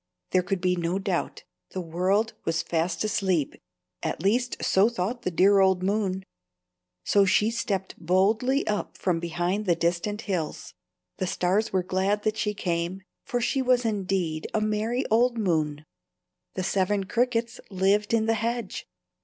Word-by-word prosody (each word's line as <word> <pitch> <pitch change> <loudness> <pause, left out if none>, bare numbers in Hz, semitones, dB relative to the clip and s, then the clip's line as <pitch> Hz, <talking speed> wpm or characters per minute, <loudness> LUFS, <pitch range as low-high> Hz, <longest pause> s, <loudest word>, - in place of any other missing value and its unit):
There 185 - +4
could 180 +1 -2
be 180 0 +2
no 175 +1 -1
doubt; 190 -3 -2 0.3
the 190 - -3
world 185 +6 0
was 165 0 0
fast 170 +3 -1
asleep, 190 -7 0 0.5
at 160 - -3
least 240 +5 +1
so 195 +4 +4
thought 235 +2 -3
the 185 - -1
dear 195 +3 +4
old 190 -1 +3
moon. 195 -1 0 0.8
So 200 - +4
she 210 +3 +3
stepped 200 -5 -3
boldly 215 - +2
up 210 -1 -2
from 175 -3 0
behind 175 +5 -2
the 175 - +4
distant 170 +5 -1
hills. 180 -8 -4 0.4
The 185 - -1
stars 190 +5 +1
were 185 -1 +1
glad 195 +3 0
that 215 0 0
she 210 -1 -1
came, 175 0 -2 0.2
for 245 - -1
she 265 +3 0
was 250 -1 +2
indeed 190 -7 -1
a - - +3
merry 215 +4 0
old 235 +2 +3
moon. 155 -7 0 0.7
The 185 - -2
Seven 195 +2 +1
Crickets 235 +2 0
lived 200 +2 +1
in 225 -1 +2
the 225 - +2
hedge. 230 -2 -3
195 Hz, 155 wpm, -26 LUFS, 180-220 Hz, 0.8 s, There